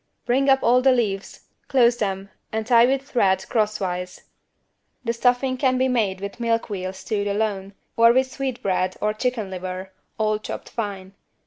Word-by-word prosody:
Bring 270 +3 +2
up 270 0 +4
all 250 +2 +4
the 265 +1 +5
leaves, 205 -6 -1 0.3
close 240 -3 +4
them 195 -3 -3 0.2
and 220 0 -2
tie 235 0 +6
with 270 +1 0
thread 190 -8 +1
crosswise. 190 -5 -2 0.8
The 230 -1 -1
stuffing 250 +2 +1
can 255 -1 +2
be 260 +1 +2
made 210 -7 0
with 200 +3 -6
milk 230 -1 0
veal 185 -2 -3
stewed 200 +2 -3
alone, 200 -1 -2 0.2
or 230 0 +6
with 260 +1 +2
sweetbread 200 -10 -2
or 210 0 0
chicken 220 -3 -2
liver, 185 +1 -6 0.3
all 215 -1 +1
chopped - - -7
fine. 195 -4 -5
220 Hz, 160 wpm, -23 LUFS, 195-250 Hz, 0.8 s, tie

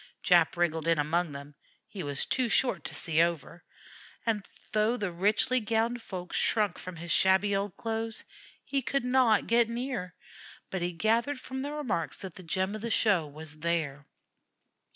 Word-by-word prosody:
Jap 170 -2 +4
wriggled 165 -2 0
in 165 -1 +4
among 160 +3 0
them; 140 +1 -9 0.3
he 200 - -7
was 145 -3 -1
too 255 -2 0
short 210 - +2
to - - -6
see 160 0 +1
over, 170 0 -1 0.6
and 215 -3 0 0.2
though 215 +3 +2
the 200 -5 -2
richly 210 +8 +2
gowned 230 +2 0
folks 180 -4 -5
shrunk 210 -5 +1
from 185 -1 -7
his 170 +1 -6
shabby 190 +2 +4
old 195 -2 -2
clothes, 225 0 -3 0.4
he 275 -1 0
could 260 +2 -1
not 250 -4 +4
get 235 0 +3
near; 235 -7 -4 0.6
but 190 - -2
he 175 +1 0
gathered 230 +10 +1
from 265 +1 -6
the 285 +2 -3
remarks 255 - -2
that 190 -3 -6
the 190 - -10
gem 190 +3 -1
of 215 - -5
the 230 - -3
show 195 -8 +3
was 155 +1 -9
there. 155 -4 -1
195 Hz, 175 wpm, -29 LUFS, 170-230 Hz, 0.6 s, Jap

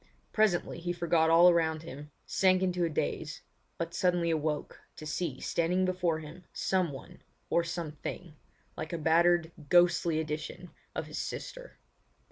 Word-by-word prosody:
Presently 205 -6 +2
he 175 +1 -2
forgot 170 -2 +2
all 170 +2 +7
around 160 -2 +3
him, 145 -1 -9 0.2
sank 185 -1 +3
into 180 -1 0
a 170 - +1
daze, 150 - -3 0.3
but 170 0 -3
suddenly 175 -2 +2
awoke 155 -1 -2
to 155 - -9
see 150 -3 -3
standing 180 +3 +1
before 180 -3 0
him 160 +3 -10
someone 175 -8 -2 0.3
or 170 - +3
something 165 0 -6 0.4
like 155 +2 -5
a - - -1
battered, 170 +1 +3 0.2
ghostly 175 -2 +4
edition 155 -1 -5 0.2
of - - -2
his - - -6
sister. - - -6
170 Hz, 140 wpm, -30 LUFS, 160-180 Hz, 0.4 s, all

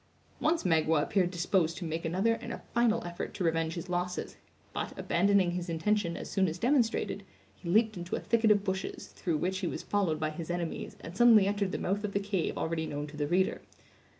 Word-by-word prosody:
Once 325 +2 +1
Magua 160 -3 +3
appeared 185 0 +1
disposed 175 -2 +1
to 180 - -5
make 160 +1 -3
another 190 +8 +2
and - - -6
a - - -7
final 235 -1 +2
effort 175 0 -5
to 190 - -2
revenge 165 -1 0
his 170 +1 -5
losses; 180 0 -2 0.4
but, - - -4
abandoning 190 0 +3
his 175 0 -4
intention 170 +1 0
as - - -6
soon 190 -2 +1
as 165 +1 -3
demonstrated, 240 +1 +1 0.3
he 170 - -8
leaped 220 +4 +3
into 175 0 -4
a - - -2
thicket 230 -1 +2
of 205 -1 +4
bushes, 190 -1 -3
through 170 -4 -2
which 185 +4 -1
he 185 - -2
was - - -4
followed 185 -7 0
by 155 0 -1
his 160 +1 -7
enemies, 175 -2 -3
and 165 - -8
suddenly 225 -2 +7
entered 200 -1 0
the - - -2
mouth 200 +3 -1
of 205 -1 -3
the 200 - +2
cave 200 -4 -2
already 160 -1 -1
known 145 0 -3
to 150 0 -11
the 145 -1 -1
reader. 185 +4 +1
180 Hz, 215 wpm, -30 LUFS, 165-205 Hz, 0.4 s, suddenly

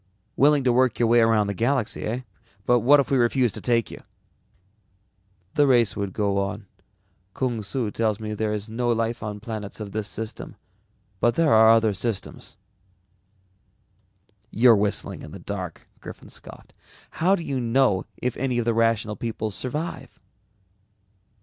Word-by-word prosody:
"Willing 145 0 +4
to 125 -2 +3
work 130 0 +2
your 120 - +2
way 120 +1 +5
around 115 -2 +3
the 100 - -2
galaxy, 115 +1 -1
eh? 120 +4 -2 0.4
But 125 0 +4
what 140 +6 +5
if 140 - -1
we 135 - +3
refused 120 -1 +2
to - - -7
take 115 -3 0
you?" - - -10 1.5
"The 145 -1 +3
race 120 -4 +3
would 100 -2 -3
go 100 0 0
on. 100 +2 -3 0.7
Kung 120 -4 -1
Su 110 +1 -3
tells 110 -1 -1
me 110 -1 -5
there 105 0 -2
is 105 0 -4
no 120 +2 -2
life 115 0 -1
on 105 -1 -5
planets 110 -2 -7
of 105 -2 -6
this 110 0 -3
system, 110 +1 -7 0.6
but 120 +3 +2
there 165 -3 +3
are 110 0 +7
other 115 -2 +4
systems." 110 +1 -5 1.9
"You're 115 +1 +5
whistling 100 0 -1
in - - -10
the - - -7
dark," - - -7
Griffin - - -11
scoffed. - - -12 0.5
"How 185 +4 +4
do 170 - -5
you 135 -4 -2
know 120 -5 +1
if 125 -1 -2
any 125 -1 -1
of 120 - 0
the 115 - +2
Rational 115 -1 +1
People 110 -2 -4
survive?" 135 - -5
115 Hz, 160 wpm, -24 LUFS, 105-125 Hz, 1.9 s, are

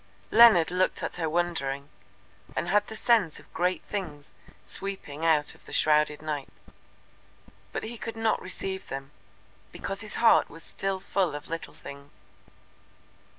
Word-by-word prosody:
Leonard 220 -8 +8
looked 185 +1 +1
at - - -3
her 165 -2 -1
wondering, 155 -5 -1 0.7
and 170 - -1
had 205 +2 +3
the 220 - -7
sense 215 -8 +2
of - - -19
great 180 +2 0
things 155 -8 -5 0.3
sweeping 190 -6 -4
out 155 -3 +3
of - - -19
the - - -10
shrouded 150 0 +3
night. 150 -3 -3 1.2
But - - -3
he 225 +1 -6
could 230 -1 -5
not 225 -1 +1
receive 190 +1 -4
them, 135 +1 -6 0.6
because 195 +1 -5
his 215 - -6
heart 230 - +5
was 165 +2 -10
still 195 -1 -2
full 185 -4 0
of 145 - -7
little 165 0 -5
things. 140 0 -11
175 Hz, 150 wpm, -28 LUFS, 150-195 Hz, 1.2 s, Leonard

